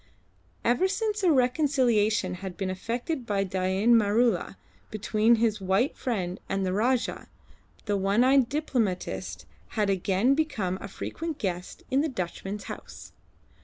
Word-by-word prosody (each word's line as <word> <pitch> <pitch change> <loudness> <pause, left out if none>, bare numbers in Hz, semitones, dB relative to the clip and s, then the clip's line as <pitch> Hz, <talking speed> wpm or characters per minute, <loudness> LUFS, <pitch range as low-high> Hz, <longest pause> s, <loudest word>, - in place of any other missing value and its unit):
Ever 245 +11 +3
since 420 +1 -1
a 365 -3 +4
reconciliation 250 - +2
had 190 -2 -6
been 190 -2 -2
effected 240 - -3
by 200 -1 +1
Dain 190 +4 +1
Maroola 220 -2 +2 0.3
between 215 +2 +2
his 220 -2 +1
white 195 +8 +1
friend 190 -7 -3
and 195 0 0
the 185 - -1
Rajah, 240 +5 0 0.6
the 205 -1 0
one 195 +4 +2
eyed 260 -1 +4
diplomatist 245 - -2 0.3
had 205 -2 +2
again 195 +6 +2
become 210 - -1
a - - -5
frequent 320 - -5
guest 180 -2 -4
in 270 +2 +3
the 315 - 0
Dutchman's 195 -2 -5
house. - - -9
215 Hz, 135 wpm, -27 LUFS, 195-255 Hz, 0.6 s, a